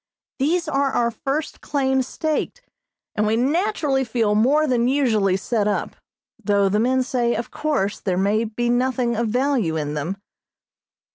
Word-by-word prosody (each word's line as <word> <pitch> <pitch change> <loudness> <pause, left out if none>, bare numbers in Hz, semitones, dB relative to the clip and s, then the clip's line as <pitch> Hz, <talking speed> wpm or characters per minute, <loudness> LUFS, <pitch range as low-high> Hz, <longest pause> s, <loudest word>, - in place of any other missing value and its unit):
These 330 +5 +1
are 280 -2 +1
our 235 -1 +1
first 275 +6 -4
claims 265 -3 0
staked, 315 - -3 0.5
and 215 0 0
we 220 - +2
naturally 295 - +1
feel 225 -3 0
more 270 +9 +3
than 245 -4 +1
usually 220 -9 +2
set 210 +1 -1
up, 205 - -2 0.5
though 200 -1 +2
the 210 +2 +1
men 255 +3 +2
say 245 -2 0
of 235 - -4
course 275 -10 -1
there 185 -3 -1
may 205 +4 +1
be 230 +2 -2
nothing 245 0 +1
of 230 +1 0
value 245 - 0
in 150 -2 -2
them. 155 +6 -3
240 Hz, 155 wpm, -22 LUFS, 210-275 Hz, 0.5 s, more